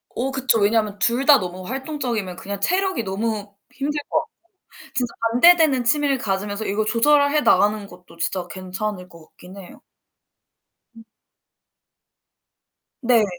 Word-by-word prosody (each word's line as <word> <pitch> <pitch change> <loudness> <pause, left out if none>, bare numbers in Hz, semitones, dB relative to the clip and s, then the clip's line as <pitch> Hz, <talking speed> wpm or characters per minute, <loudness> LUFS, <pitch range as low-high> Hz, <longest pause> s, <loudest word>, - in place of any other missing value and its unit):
어 265 +3 -2
그쵸. 260 -4 +1
왜냐면 210 0 +1
둘 245 +3 +1
다 290 -2 +7
너무 185 0 -6
활동적이면 250 - -4
그냥 200 +2 -6
체력이 375 - 0
너무 205 +1 -4 0.2
힘들 295 +2 -3
것 315 - +2
같고. 315 - -8 0.6
진짜 245 -3 -1 0.2
반대되는 305 -2 +5
취미를 280 +2 +2
가지면서 205 +1 -3
이걸 215 +2 -1
조절해 285 +5 +3
나가는 210 0 +3
것도 180 -2 -16
진짜 180 +1 -2
괜찮을 185 +1 -5
것 170 -2 -16
같긴 185 +2 -15
해요. 185 - -13 1.2
음. 225 - -13 2.0
네. 235 -3 +3
225 Hz, 280 characters per minute, -22 LUFS, 195-270 Hz, 2.0 s, 다